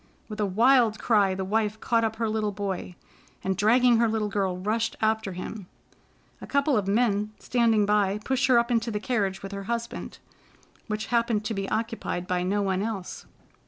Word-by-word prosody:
With 215 Hz, -1 st, -8 dB
a 210 Hz, -, +1 dB
wild 230 Hz, +2 st, +4 dB
cry, 205 Hz, -4 st, +2 dB
the 190 Hz, 0 st, -3 dB
wife 215 Hz, +1 st, 0 dB
caught 230 Hz, 0 st, +1 dB
up 220 Hz, -1 st, -1 dB
her 225 Hz, 0 st, -1 dB
little 215 Hz, -1 st, -1 dB
boy, 195 Hz, -3 st, -4 dB, 0.5 s
and, 190 Hz, 0 st, 0 dB
dragging 235 Hz, +4 st, +4 dB
her 230 Hz, 0 st, +3 dB
little 215 Hz, -1 st, -1 dB
girl, 195 Hz, -3 st, -1 dB
rushed 220 Hz, +4 st, -1 dB
after 220 Hz, -3 st, 0 dB
him. 185 Hz, +2 st, -7 dB, 0.7 s
A -, -, -8 dB
couple 280 Hz, 0 st, +2 dB
of 200 Hz, -4 st, 0 dB
men 210 Hz, -1 st, +1 dB
standing 230 Hz, -4 st, +2 dB
by 205 Hz, -1 st, +2 dB
pushed 265 Hz, 0 st, +1 dB
her 255 Hz, -2 st, +5 dB
up 235 Hz, +1 st, +2 dB
into 230 Hz, 0 st, +1 dB
the 210 Hz, -2 st, -2 dB
carriage 205 Hz, -5 st, -1 dB
with 195 Hz, -, -6 dB
her 200 Hz, 0 st, -6 dB
husband, 235 Hz, +1 st, -4 dB, 0.7 s
which 215 Hz, -1 st, -3 dB
happened 230 Hz, -3 st, +1 dB
to 220 Hz, -, -2 dB
be 195 Hz, -1 st, -3 dB
occupied 225 Hz, -5 st, -3 dB
by 180 Hz, 0 st, -1 dB
no 200 Hz, +3 st, 0 dB
one 190 Hz, -1 st, 0 dB
else. 205 Hz, -4 st, -5 dB
215 Hz, 190 wpm, -26 LUFS, 195-230 Hz, 0.7 s, her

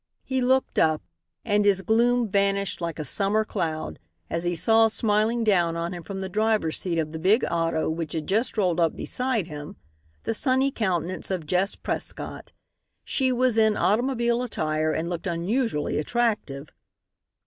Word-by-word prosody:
He 260 Hz, -1 st, -1 dB
looked 260 Hz, +1 st, +2 dB
up, 155 Hz, -1 st, +2 dB, 0.4 s
and 210 Hz, -2 st, +2 dB
his 195 Hz, -2 st, +3 dB
gloom 235 Hz, +2 st, +3 dB
vanished 200 Hz, -1 st, 0 dB
like 170 Hz, -2 st, -3 dB
a 155 Hz, -, -4 dB
summer 205 Hz, +8 st, +1 dB
cloud 160 Hz, -5 st, -3 dB, 0.3 s
as 165 Hz, +1 st, -1 dB
he 175 Hz, 0 st, 0 dB
saw 225 Hz, +5 st, +4 dB
smiling 220 Hz, +1 st, +1 dB
down 175 Hz, -6 st, +2 dB
on 170 Hz, +1 st, -3 dB
him 175 Hz, -, -6 dB
from 195 Hz, +2 st, -6 dB
the 190 Hz, -, -3 dB
driver's 215 Hz, -4 st, 0 dB
seat 175 Hz, -3 st, -2 dB
of 155 Hz, -2 st, -1 dB
the 160 Hz, -, -6 dB
big 200 Hz, +8 st, +3 dB
auto 165 Hz, -1 st, 0 dB
which 160 Hz, -1 st, -3 dB
had 160 Hz, -2 st, -3 dB
just 220 Hz, +5 st, 0 dB
rolled 180 Hz, -4 st, +1 dB
up 165 Hz, -1 st, +2 dB
beside 250 Hz, -6 st, -1 dB
him, 150 Hz, +3 st, -8 dB, 0.5 s
the -, -, -1 dB
sunny 260 Hz, +3 st, +2 dB
countenance 185 Hz, -6 st, -2 dB
of 185 Hz, -5 st, -2 dB
Jess 180 Hz, +5 st, +1 dB
Prescott. -, -, -5 dB, 0.5 s
She 260 Hz, -2 st, +1 dB
was 250 Hz, -2 st, +2 dB
in 220 Hz, -1 st, +3 dB
automobile 235 Hz, +2 st, +1 dB
attire 155 Hz, -9 st, -1 dB
and 160 Hz, +2 st, -2 dB
looked 175 Hz, +1 st, -4 dB
unusually 175 Hz, -, -1 dB
attractive. 155 Hz, -, -1 dB
195 Hz, 165 wpm, -25 LUFS, 165-225 Hz, 0.5 s, saw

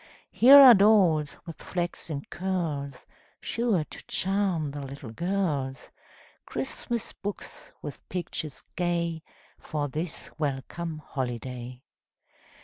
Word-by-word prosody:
Here 270 Hz, +4 st, +9 dB
are 265 Hz, -3 st, +11 dB
dolls 190 Hz, -8 st, +4 dB
with 165 Hz, -, -9 dB
flaxen 170 Hz, -4 st, -3 dB
curls, 160 Hz, -8 st, -3 dB, 0.3 s
Sure 230 Hz, -8 st, 0 dB
to -, -, -11 dB
charm 190 Hz, -6 st, 0 dB
the 145 Hz, 0 st, -6 dB
little 135 Hz, -3 st, -8 dB
girls; 150 Hz, -5 st, -2 dB, 0.6 s
Christmas 220 Hz, -, -3 dB
books, 205 Hz, 0 st, -7 dB
with 145 Hz, -, -8 dB
pictures 155 Hz, -6 st, -4 dB
gay, 170 Hz, -2 st, -1 dB, 0.4 s
For 145 Hz, -2 st, -3 dB
this 155 Hz, +4 st, -3 dB
welcome 155 Hz, +3 st, -3 dB
holiday. 125 Hz, -1 st, -5 dB
160 Hz, 100 wpm, -27 LUFS, 140-185 Hz, 0.6 s, are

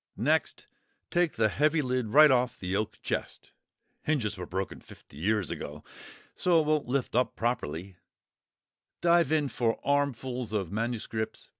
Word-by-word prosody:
Next, -, -, 0 dB, 0.5 s
take 175 Hz, -2 st, +2 dB
the 110 Hz, -1 st, +2 dB
heavy 150 Hz, +7 st, +2 dB
lid 125 Hz, -2 st, -1 dB
right 150 Hz, +6 st, +7 dB
off 125 Hz, -2 st, +2 dB
the 95 Hz, +1 st, -2 dB
oak 105 Hz, +1 st, -2 dB
chest -, -, -4 dB, 0.5 s
(hinges 120 Hz, -9 st, 0 dB
were 90 Hz, -3 st, -7 dB
broken 95 Hz, +2 st, -4 dB
fifty -, -, -16 dB
years 105 Hz, +4 st, 0 dB
ago, 75 Hz, +1 st, -6 dB, 0.5 s
so 175 Hz, -2 st, +3 dB
it 155 Hz, -, +1 dB
won't 155 Hz, -3 st, +1 dB
lift 130 Hz, 0 st, -1 dB
up 125 Hz, +1 st, +1 dB
properly), 95 Hz, -6 st, -2 dB, 1.1 s
dive 170 Hz, -3 st, +4 dB
in 155 Hz, -2 st, +2 dB
for 115 Hz, -2 st, -1 dB
armfuls 130 Hz, -4 st, -1 dB
of 95 Hz, -6 st, -1 dB
MSS. 110 Hz, 0 st, -3 dB
120 Hz, 145 wpm, -29 LUFS, 105-145 Hz, 1.1 s, right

